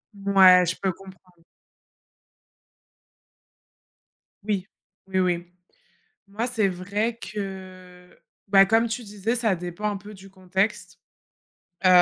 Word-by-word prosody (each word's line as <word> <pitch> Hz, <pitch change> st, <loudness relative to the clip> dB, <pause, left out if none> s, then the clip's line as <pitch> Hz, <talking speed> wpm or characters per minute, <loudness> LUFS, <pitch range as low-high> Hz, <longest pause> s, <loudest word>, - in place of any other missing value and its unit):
Ouais, 190 Hz, -2 st, +6 dB
je 170 Hz, -, -1 dB
peux 190 Hz, -, 0 dB
comprendre. 180 Hz, -2 st, -17 dB, 3.0 s
Oui. 200 Hz, -2 st, -2 dB, 0.4 s
Oui, 190 Hz, -1 st, -1 dB
oui. 175 Hz, -2 st, 0 dB, 0.8 s
Moi, 220 Hz, +4 st, -3 dB
c'est 225 Hz, -5 st, +1 dB
vrai 200 Hz, +5 st, -2 dB
que, 185 Hz, -2 st, -9 dB, 0.3 s
bah, 195 Hz, 0 st, +6 dB
comme 225 Hz, +3 st, +3 dB
tu 235 Hz, +2 st, -4 dB
disais, 210 Hz, +2 st, -3 dB
ça 220 Hz, -6 st, +1 dB
dépend 180 Hz, +5 st, -4 dB
un 205 Hz, -, -4 dB
peu 205 Hz, +2 st, -11 dB
du 195 Hz, 0 st, -14 dB
contexte. 190 Hz, +2 st, -2 dB, 0.9 s
Heu, -, -, +6 dB
195 Hz, 110 wpm, -24 LUFS, 185-210 Hz, 3.0 s, Ouais